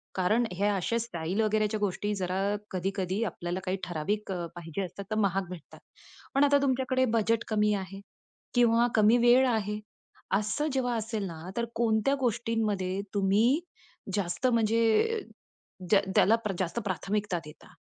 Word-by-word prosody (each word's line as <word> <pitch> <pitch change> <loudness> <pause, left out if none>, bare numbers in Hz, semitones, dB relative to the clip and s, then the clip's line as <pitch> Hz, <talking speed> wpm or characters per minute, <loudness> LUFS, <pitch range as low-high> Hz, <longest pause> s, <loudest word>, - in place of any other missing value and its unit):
कारण 210 +6 +2
हे 195 +3 -1
अशा 205 +3 0
स्टाईल 185 -2 -2
वगैरेच्या 215 0 +1
गोष्टी 205 +1 -1
जरा 185 -1 -2 0.3
कधी-कधी 190 +2 -2
आपल्याला 175 -2 -4
काही 185 +1 -1
ठराविक 190 +5 -2
अ, 175 -2 -3
पाहिजे 175 +2 -5
असतात 195 +2 -6
तर - - +1
महाग 195 -3 0
भेटतात. 175 -4 -10 0.6
पण 275 - +5
आता 285 0 +5
तुमच्याकडे 260 -1 +1
बजेट 225 +1 +1
कमी 210 -1 +2
आहे. 195 0 -6 0.5
किंवा 240 -1 +4
कमी 220 +2 +5
वेळ 245 +2 +5
आहे. 210 -2 -1 0.6
असं 215 +9 -1
जेव्हा 245 -2 0
असेल 220 -1 -3
ना, 170 +1 -8
तर 235 - +1
कोणत्या 225 +3 +2
गोष्टींमध्ये 220 -6 -1
तुम्ही 210 +8 +3 0.6
जास्त 185 +4 0
म्हणजे, 230 - +2 0.7
ज्या 200 -2 +5
त्याला 220 - +6 0.2
जास्त 185 +3 -1
प्राथमिकता 195 0 -1
देता? 150 - -14
210 Hz, 140 wpm, -29 LUFS, 190-230 Hz, 0.7 s, त्याला